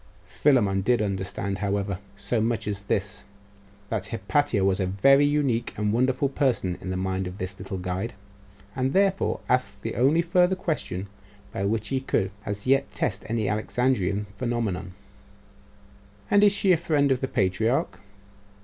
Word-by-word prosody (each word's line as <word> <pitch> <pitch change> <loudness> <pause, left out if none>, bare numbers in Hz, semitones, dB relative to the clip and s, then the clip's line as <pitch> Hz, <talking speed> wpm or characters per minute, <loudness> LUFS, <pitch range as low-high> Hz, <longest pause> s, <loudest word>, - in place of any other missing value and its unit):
Philammon 105 -9 +2
did 120 +5 +2
understand, 100 -1 -2
however, 100 -2 -1 0.2
so 110 +2 -1
much 115 -2 -1
as 100 -1 -3
this, 100 0 -2 0.7
that 105 -3 -2
Hypatia 110 0 0
was 95 0 +2
a 95 - 0
very 135 +10 +5
unique 145 -5 0
and 105 0 0
wonderful 130 +3 +2
person 130 - 0
in 95 - -6
the 95 - -2
mind 95 0 -2
of 90 +1 -7
his 95 0 -4
little 95 +1 -5
guide; 95 +5 -3 0.6
and 130 0 0
therefore 195 0 +2
asked 125 -5 0
the 115 - -3
only 145 +8 +3
further 180 +2 +3
question 145 - -3 0.5
by 100 - -2
which 110 +1 -1
he 135 -1 0
could 95 -7 0 0.2
as 100 0 -4
yet 135 +1 +2
test 105 -5 -2
any 110 -2 -1
Alexandrian 105 -1 0
phenomenon 110 -7 -2 1.4
'And 205 0 +6
is 205 - +7
she 200 -1 +2
a 175 - +5
friend 150 -4 +1
of 130 - +1
the 130 - 0
patriarch? 100 -1 0
110 Hz, 160 wpm, -26 LUFS, 95-135 Hz, 1.4 s, is